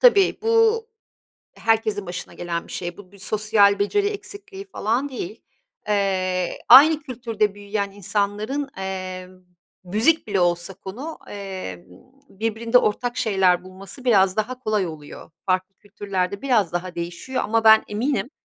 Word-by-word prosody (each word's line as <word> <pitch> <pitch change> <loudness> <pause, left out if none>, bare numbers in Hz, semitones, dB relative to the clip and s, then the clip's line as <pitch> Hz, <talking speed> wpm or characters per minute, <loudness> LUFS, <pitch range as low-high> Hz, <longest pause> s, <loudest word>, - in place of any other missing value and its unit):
tabii 405 -6 +5
bu 455 0 +3 0.7
herkesin 220 -3 0
başına 180 +1 -7
gelen 170 -1 -4
bir - - -10
şey. 175 -1 -5
Bu 195 -1 -14
bir 200 - -16
sosyal 205 0 +3
beceri 400 - +1
eksikliği 405 -1 -8
falan 250 - -1
değil. 355 +9 -7 0.5
Eee, 185 -3 0
aynı 305 +3 +9
kültürde 230 -7 -2
büyüyen 200 0 -3
insanların, 205 +7 -2
eee, 185 -1 -5 0.6
müzik 225 - +2
bile 195 -2 +1
olsa 175 +2 0
konu, 250 - -8
eee, 190 - -7 0.4
birbirinde 225 +4 +1
ortak 245 +3 -1
şeyler 185 -4 +2
bulması 195 +7 -11
biraz 195 -5 +4
daha 245 +4 -2
kolay 215 -6 0
oluyor. 155 0 -10 0.2
Farklı 185 +1 0
kültürlerde 200 -1 -4
biraz 225 -11 +2
daha 175 +1 -3
değişiyor. 175 +10 -4
Ama 225 +1 +1
ben 220 0 +7
eminim, 235 +2 -1
205 Hz, 135 wpm, -23 LUFS, 185-250 Hz, 0.7 s, aynı